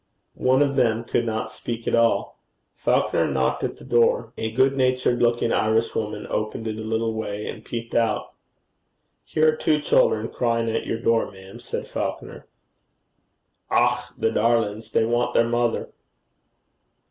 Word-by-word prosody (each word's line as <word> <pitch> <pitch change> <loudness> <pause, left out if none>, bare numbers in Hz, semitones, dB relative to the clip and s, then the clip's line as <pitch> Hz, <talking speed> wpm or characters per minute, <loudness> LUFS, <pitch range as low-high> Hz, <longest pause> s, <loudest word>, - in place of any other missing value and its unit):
One 130 +2 +4
of 140 -1 -1
them 115 -3 +2
could 120 0 -1
not 110 0 -2
speak 115 -1 -6
at - - 0
all. 115 0 +2 0.3
Falconer - - +1
knocked 65 -1 0
at - - -3
the - - -14
door. 115 -1 +2
A 110 - -3
good 130 +4 +2
natured 130 -2 +1
looking 120 -1 +2
Irishwoman 110 -1 0
opened 110 +1 -3
it 110 -1 -3
a - - -5
little 110 +1 -1
way 105 -1 -4
and - - -7
peeped 115 -1 -6
out. 115 -3 0 0.9
'Here 155 0 +3
are - - -4
two 155 0 +1
children 110 -6 +2
crying 115 -1 0
at - - -2
your 115 - -1
door, 115 -1 +1
ma'am,' 95 0 -13
said - - -5
Falconer. - - -5 1.2
'Och, 120 +1 +3 0.2
the 110 - +1
darlin's! 115 -2 0
they 110 - +2
want 120 +1 0
their 115 - +4
mother.' 120 -1 0
115 Hz, 155 wpm, -24 LUFS, 110-120 Hz, 1.2 s, One